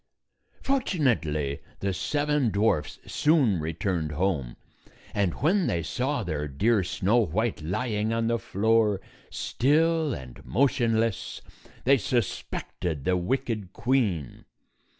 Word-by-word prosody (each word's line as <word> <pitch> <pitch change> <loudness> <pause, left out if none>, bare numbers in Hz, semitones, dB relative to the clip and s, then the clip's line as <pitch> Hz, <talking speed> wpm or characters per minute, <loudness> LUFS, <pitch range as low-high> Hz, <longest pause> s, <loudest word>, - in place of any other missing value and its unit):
Fortunately, 120 - 0 0.2
the 100 -1 -1
seven 145 +7 +1
dwarfs 100 -6 +1
soon 140 - +3
returned 80 0 -2
home, 75 -7 -1 0.6
and 100 -5 +1
when 185 +4 +3
they 85 -1 0
saw 130 - -1
their 75 -5 -2
dear 100 - +2
Snow 95 +5 +1
White 110 -1 0
lying 105 +6 -1
on 115 0 0
the 115 0 +1
floor, 105 0 +2 0.3
still 160 +3 +2
and 65 - -8
motionless, 115 - +1 0.4
they 135 +2 +5
suspected 90 - -2
the 90 - +3
wicked 105 0 -2
queen. 110 - 0
110 Hz, 110 wpm, -27 LUFS, 85-130 Hz, 0.6 s, they